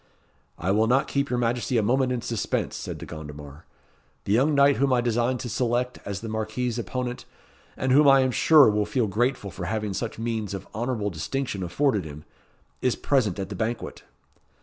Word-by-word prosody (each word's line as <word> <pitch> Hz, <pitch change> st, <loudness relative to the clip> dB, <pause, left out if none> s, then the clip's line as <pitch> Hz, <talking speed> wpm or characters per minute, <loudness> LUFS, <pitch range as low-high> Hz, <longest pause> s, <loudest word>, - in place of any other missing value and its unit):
"I 90 Hz, +4 st, -1 dB
will 110 Hz, +3 st, +3 dB
not 130 Hz, +4 st, +2 dB
keep 140 Hz, 0 st, -1 dB
your 125 Hz, -, 0 dB
Majesty 120 Hz, +1 st, 0 dB
a 110 Hz, -, +2 dB
moment 130 Hz, +4 st, +2 dB
in 120 Hz, -2 st, -2 dB
suspense," 115 Hz, -3 st, -2 dB
said -, -, -5 dB
De -, -, -8 dB
Gondomar. 75 Hz, -1 st, -9 dB, 0.6 s
"The 100 Hz, -, 0 dB
young 140 Hz, +6 st, +3 dB
knight 140 Hz, 0 st, +5 dB
whom 140 Hz, 0 st, +2 dB
I 125 Hz, -, +4 dB
design 120 Hz, +1 st, +1 dB
to 125 Hz, -, -6 dB
select 120 Hz, +2 st, -1 dB
as 100 Hz, -1 st, -4 dB
the 115 Hz, -, -6 dB
Marquis's 115 Hz, +2 st, -2 dB
opponent, 125 Hz, +1 st, -4 dB, 0.5 s
and 130 Hz, -, 0 dB
whom 145 Hz, +2 st, +6 dB
I 135 Hz, -1 st, +7 dB
am 130 Hz, -1 st, +1 dB
sure 150 Hz, +2 st, +6 dB
will 105 Hz, 0 st, 0 dB
feel 120 Hz, +2 st, +1 dB
grateful 110 Hz, 0 st, -1 dB
for 90 Hz, -, -6 dB
having 105 Hz, +2 st, -2 dB
such 115 Hz, +4 st, -4 dB
means 110 Hz, -3 st, -3 dB
of 95 Hz, -, -8 dB
honourable 110 Hz, -2 st, -2 dB
distinction 100 Hz, -, -3 dB
afforded 105 Hz, +4 st, +1 dB
him, 75 Hz, 0 st, -9 dB, 0.6 s
is 125 Hz, -, +1 dB
present 120 Hz, -10 st, +1 dB
at 95 Hz, -1 st, -4 dB
the 100 Hz, -, -5 dB
banquet." 115 Hz, +5 st, -3 dB
120 Hz, 195 wpm, -25 LUFS, 105-130 Hz, 0.6 s, I